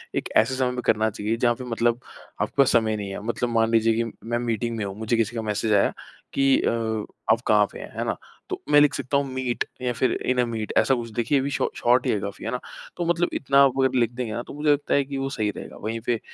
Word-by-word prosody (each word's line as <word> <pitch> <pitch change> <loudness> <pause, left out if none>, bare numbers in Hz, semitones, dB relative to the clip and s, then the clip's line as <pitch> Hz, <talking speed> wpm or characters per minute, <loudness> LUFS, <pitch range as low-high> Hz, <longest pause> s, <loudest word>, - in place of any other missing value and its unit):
एक - - -2
ऐसे 125 +4 +3
समय 130 -1 +1
में 125 0 -3
करना 110 0 +3
चाहिए, 105 +1 -2
जहाँ 120 0 +2
पे 130 - -8
मतलब 120 0 0 0.4
आपके - - -1
पास 135 - +4
समय 110 -2 +2
नहीं 100 -1 -5
है। 100 - -5
मतलब 120 +1 -1
मान 115 -1 +2
लीजिए 115 0 +4
कि 115 - -5
मैं 120 +1 -1
मीटिंग 115 -1 -2
में 110 - -2
हूँ, 95 -1 -5
मुझे 110 +1 0
किसी 115 +1 0
का 115 - -1
मैसेज 110 0 -1
आया 100 - +3 0.4
कि 135 -1 +4
अ, - - +1 0.6
आप 115 - +3
कहाँ 105 -1 +5
पे - - -9
हैं, - - -8
हैं - - -1
ना? - - -1 0.3
तो - - -4
मैं 145 - +8
लिख 145 -1 +4
सकता 140 +1 -1
हूँ, 140 - +1
मीट 130 -2 -1 0.2
या 125 - 0
फिर 130 - +1
इन 130 0 +1
अ - - +1
मीट, 115 -2 -4
ऐसा 135 - +4
कुछ। 120 -2 -5
देखिए 120 +5 +1
ये - - +2
भी 140 - -1
शॉ - - 0
शॉर्ट 120 +2 +3
ही - - +2
है 105 - 0
काफ़ी, 100 0 -6
हैं - - -2
ना? 125 - -2 0.4
तो 175 - -1
मतलब 175 +1 +1
इतना 140 0 +1
आप 135 -1 +2
अगर 130 -1 +3
लिख 120 0 +2
देंगे 120 -3 -4
ना, 120 - -2
तो - - -10
मुझे 150 +1 +1
लगता 145 0 +1
है 140 - +4
कि 140 0 -5
वो 135 0 -2
सही 110 -6 -1
रहेगा। - - -9
वहीं 110 +2 -3
पे 120 -2 +1
120 Hz, 280 wpm, -24 LUFS, 110-130 Hz, 0.6 s, मैं